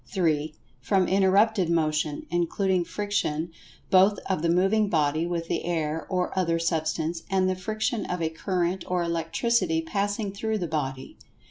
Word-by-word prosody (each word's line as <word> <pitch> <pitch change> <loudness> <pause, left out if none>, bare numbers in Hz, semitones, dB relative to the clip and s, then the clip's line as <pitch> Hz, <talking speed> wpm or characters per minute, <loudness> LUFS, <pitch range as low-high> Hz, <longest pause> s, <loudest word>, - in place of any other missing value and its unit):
(3) 155 -4 0 0.2
From 185 +9 +1
interrupted 195 0 +3
Motion, 155 -2 0
including 175 +2 +1
friction 170 -5 -2 0.4
both 195 +2 +5
of 190 -5 0
the 170 - +1
moving 195 +5 +3
body 155 0 +1
with 170 -1 -3
the - - -2
air 160 -2 -2
or 180 -1 -1
other 170 -3 +1
Substance, 165 0 -1
and 190 -1 +2
the 185 - +1
friction 215 +4 -2
of 180 - -2
a 165 -1 0
current 180 +1 -1
of - - -10
Electricity 170 +2 0
passing 200 +4 -2
through 220 +2 -2
the 180 - -2
body. 135 -4 -4
175 Hz, 150 wpm, -26 LUFS, 160-195 Hz, 0.4 s, both